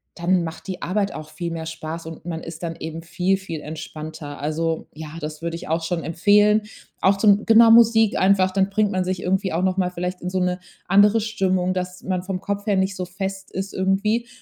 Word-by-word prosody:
dann 175 +1 +1
macht 160 +3 -7
die 185 -2 -5
Arbeit 195 +2 0
auch 155 0 -8
viel 170 -1 -4
mehr 165 -1 -5
Spaß 160 0 -6
und 160 -1 -9
man 165 -1 -5
ist 165 0 -8
dann 165 -1 -4
eben 160 +1 -6
viel, 180 +4 0
viel 165 -5 -6
entspannter. 155 -1 -7
Also, 160 +2 -2
ja, 155 0 -8
das 150 0 -6
würde 165 0 -3
ich 170 - -8
auch 165 +1 +1
schon 165 0 -2
empfehlen. 210 +5 +4 0.4
Auch 195 +1 +4
zum 205 0 +4
genau, 225 0 +7
Musik 225 -2 +6
einfach, 190 -1 +4
dann 195 +1 +1
bringt 210 0 +1
man 185 0 0
sich 185 0 -3
irgendwie 190 0 0
auch 170 - 0
noch 185 -1 +1
mal 185 -2 +1
vielleicht 180 +1 -4
in 180 - -3
so 185 - -1
'ne 180 0 0 0.3
andere 205 +4 +5
Stimmung, 185 -4 0
dass 180 0 -5
man 185 -1 -1
vom 185 0 -4
Kopf 205 +1 -4
her 205 - +3
nicht 190 +1 0
so 185 -2 -3
fest 190 +1 -5
ist 190 +1 -5
irgendwie. 205 +5 +1
185 Hz, 220 wpm, -22 LUFS, 165-195 Hz, 0.4 s, genau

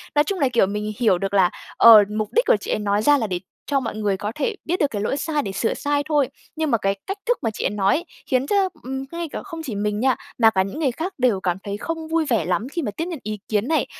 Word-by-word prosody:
Nói 295 - +5
chung 380 +4 -3
là, 275 -3 +3
kiểu, 235 - +5
mình 210 +1 -3
hiểu 215 -7 +4
được 195 +2 -3
là, 190 -3 +5 0.3
ờ, 220 -3 +9
mục 215 -1 0
đích 475 - +3
của - - +5
chị - - -5
ấy - - 0
nói 205 0 +1
ra 290 +4 +5
là 225 -4 -1
để 180 -2 -2 0.3
cho 280 -1 +1
mọi 230 -4 -4
người 205 -3 0
có 210 +2 -3
thể 415 +9 -1
biết 355 +2 -1
được 290 - +3
cái 205 -2 -3
lỗi 270 +6 -1
sai 300 -1 -1
để 195 - -4
sửa 225 +4 0
sai 290 0 -1
thôi, 290 -4 +3 0.3
nhưng 315 -2 -1
mà 230 - +4
cái 195 -1 0
cách 390 +1 -3
thức 485 +1 +2
mà 225 - 0
chị - - -5
ấy - - +3
nói 200 -2 +2
ấy 340 +3 -3 0.2
khiến 260 +1 +1
cho, 390 0 +2
ừm, 265 +2 -4
ngay 340 -1 -4
cả - - -5
không 330 -4 -7
chỉ 235 -8 -5
mình 210 +1 -1
nha, 260 +1 +3 0.2
mà 225 -2 +6
cả 190 -3 +1
những 195 +10 -6
người 280 -6 +1
khác 335 +9 -4
đều 245 -6 +2
cảm 180 -2 -1
thấy 200 0 -4
không 325 +5 -4
vui 325 0 +1
vẻ 220 -10 +2
lắm 195 +7 -1
khi 340 - -2
mà 210 - -2
tiếp 330 - -1
nhận 340 -6 -5
ý 215 0 -4
kiến 215 +3 0
này. 320 - +2
245 Hz, 300 wpm, -22 LUFS, 205-310 Hz, 0.3 s, ờ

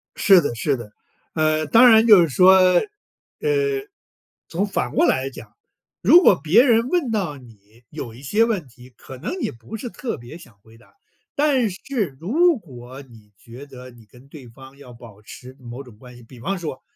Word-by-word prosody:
是 190 -3 +5
的 145 - -3
是 135 +4 -1
的。 115 -3 -11 0.4
呃， 155 -1 0
当 240 +8 +6
然 225 0 +5
就 210 -5 +7
是 165 - +1
说， 185 +7 +5
呃， 185 -1 +4 1.7
从 180 +5 -2
反 195 -10 -3
过 - - +2
来 130 +1 0
讲， 135 - -14 0.5
如 350 - +6
果 195 - +5
别 185 +10 +4
人 235 -2 +2
问 320 -8 -1
到 185 -9 -3
你 115 -2 -20
有 130 -7 -8
一 125 - -14
些 210 +11 +1
问 210 -9 -3
题， 125 +1 -18
可 130 - -12
能 130 - -6
你 - - -3
不 115 - -11
是 230 +3 -7
特 245 0 -6
别 120 +7 -12
想 120 -11 -18
回 110 +2 -20
答， 120 - -25 0.4
但 280 -6 +1
是 200 - -5
如 320 - +2
果 130 - -13
你 115 -6 -19
觉 120 +7 -13
得 130 -2 -13
你 120 -2 -19
跟 125 +5 -20
对 140 -4 -13
方 130 +3 -16
要 135 -3 -14
保 115 -3 -16
持 125 +4 -13
某 125 +1 -10
种 120 -5 -17
关 125 +2 -15
系， 120 - -16
比 120 +1 -16
方 195 +12 -4
说 155 -7 -7
140 Hz, 210 characters per minute, -21 LUFS, 120-200 Hz, 1.7 s, 就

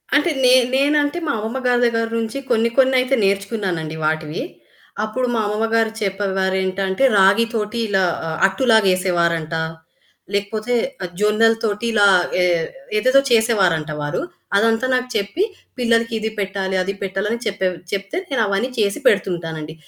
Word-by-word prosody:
అంటే 295 +4 +3 0.2
నేన్ 250 -1 +5
నేనంటే 290 +3 +2
మా 285 - +1
అమ్మమ్మ 220 +5 -4
గారి 245 0 +2
దగ్గర 230 -1 0
నుంచి 225 +3 -4
కొన్ని 230 -1 +2
కొన్నయితే 260 0 +3
నేర్చుకున్నానండి 195 -5 -1
వాటివి. 155 0 -2 0.6
అప్పుడు 250 +4 -2
మా 225 - +1
అమ్మమ్మ 210 +2 -1
గారు 225 -1 +2
చెప్పేవారేంటంటే 190 0 -1
రాగి 200 +4 +5
తోటి 215 +1 -2
ఇలా 195 -2 +1 0.4
అట్టులాగా 220 +1 +3
వేసేవారంట, 170 -3 0 0.8
లేకపోతే 215 +4 -2 0.5
జొన్నల 215 +2 +3
తోటి 210 +1 -1
ఇలా 205 -2 +5 0.3
ఏ - - +3 0.5
ఏదేదో 255 +5 +4
చేసేవారంట 195 -9 +2
వారు. 145 0 -2 0.4
అదంతా 225 +3 +2
నాకు 250 0 -1
చెప్పి, 205 - -1 0.3
పిల్లలకి 230 -2 +1
ఇది 220 0 -2
పెట్టాలి, 195 -1 -2
అది 195 +2 -3
పెట్టాలి 195 +1 -2
అని 235 - -2
చెప్పే 200 -2 -1 0.3
చెప్తే, 200 - -3
నేనవన్నీ 225 -3 0
చేసి 200 -2 0
పెడుతుంటానండి. 165 -5 -1
210 Hz, 135 wpm, -20 LUFS, 190-230 Hz, 0.8 s, నేన్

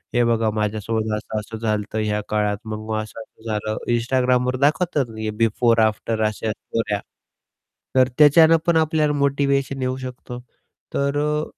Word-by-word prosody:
हे 120 - +4
बघा 115 -1 +2
माझ्यासोबत 110 +1 -1
असं-असं 110 +1 -5
झालं 110 -2 -1
होतं, 110 - -3
ह्या 105 0 0
काळात, 105 -1 0
मग 110 0 -5
असं-असं 110 +1 -10
झालं 110 0 -2 0.2
Instagramवर 125 +1 +1
दाखवतात 150 -1 +2
ना 110 -1 -8
हे, 110 - -2
बिफोर, 115 +1 +3
आफ्टर 110 +1 -2
अशा 110 +1 -2
स्टोऱ्या. 105 -1 -3 1.0
तर 130 0 +5
त्याच्यानं 160 +2 +7
पण 170 -1 +4
आपल्याला 155 -1 +2
मोटिवेशन 140 -1 0
येऊ 130 0 -1
शकतो. 125 -1 -8 0.6
तर 140 +1 0
अ, 150 +1 0
115 Hz, 145 wpm, -22 LUFS, 110-140 Hz, 1.0 s, त्याच्यानं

